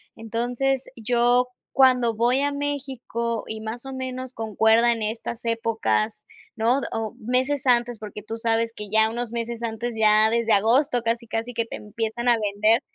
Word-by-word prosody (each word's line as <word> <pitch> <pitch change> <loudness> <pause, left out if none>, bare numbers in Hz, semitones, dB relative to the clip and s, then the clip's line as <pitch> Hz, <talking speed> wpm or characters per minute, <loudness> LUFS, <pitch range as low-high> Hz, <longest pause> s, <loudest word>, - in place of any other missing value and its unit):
Entonces, 245 +4 -1
yo 245 +2 +2 0.3
cuando 250 -4 +4
voy 240 +4 +2
a 285 0 +1
México, 265 -5 -3
y 220 0 -5
más 225 +3 -6
o 270 - -6
menos 260 -1 -5
concuerda 225 +1 +3
en 230 -2 -1
estas 225 +2 -4
épocas, 225 -2 -1 0.3
¿no? 235 +4 +2
O 225 -1 -3
meses 260 +4 0
antes, 240 -2 +2
porque 210 -1 -8
tú 225 +2 -6
sabes 230 0 0
que 210 -1 -6
ya 220 +1 +3
unos 240 0 -3
meses 235 0 -4
antes, 230 +1 -3
ya 215 0 +5
desde 230 -1 +2
agosto, 245 +5 +3
casi, 230 0 -1
casi 225 +2 -3
que 230 -1 -1
te - - -7
empiezan 225 +3 -3
a 240 - +5
vender. 215 +4 +3
230 Hz, 165 wpm, -24 LUFS, 220-245 Hz, 0.3 s, ya